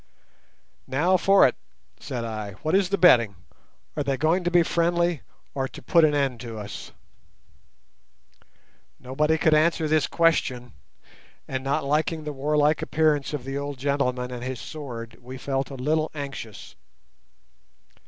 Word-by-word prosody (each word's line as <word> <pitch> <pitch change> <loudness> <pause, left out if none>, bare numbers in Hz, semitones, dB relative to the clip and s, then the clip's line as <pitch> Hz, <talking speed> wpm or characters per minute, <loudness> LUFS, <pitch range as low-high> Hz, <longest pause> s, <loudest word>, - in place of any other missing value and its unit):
"Now 160 +8 +2
for 195 -1 +5
it," 125 - -3 0.4
said 120 -3 -5
I. 110 -3 -5
"What 155 - -1
is 190 -1 +3
the 200 - +1
betting? 115 - +5 0.6
Are 150 - -1
they 140 -1 -1
going 165 +7 +1
to 175 - +1
be 175 -1 +4
friendly 170 -1 +1 0.3
or 135 -1 -1
to - - -11
put 170 -2 +4
an 150 -1 +4
end 135 -4 0
to 115 -3 -7
us?" 105 -1 -8 2.1
Nobody 150 +5 0
could 160 0 +3
answer 155 +1 +3
this 155 -1 +2
question, 130 -8 +1 0.7
and, 130 0 -3
not 140 +3 0
liking 155 +3 0
the 150 -1 -5
warlike 150 +2 +1
appearance 150 -3 +1
of 145 -4 -4
the 135 +2 -4
old 145 -1 -5
gentleman 125 -2 -1
and 120 -1 -6
his 130 -1 -4
sword, 120 -7 -8
we 130 +2 -9
felt 135 0 -2
a 140 - -7
little 155 +4 0
anxious. 140 -7 -7
145 Hz, 150 wpm, -25 LUFS, 130-160 Hz, 2.1 s, for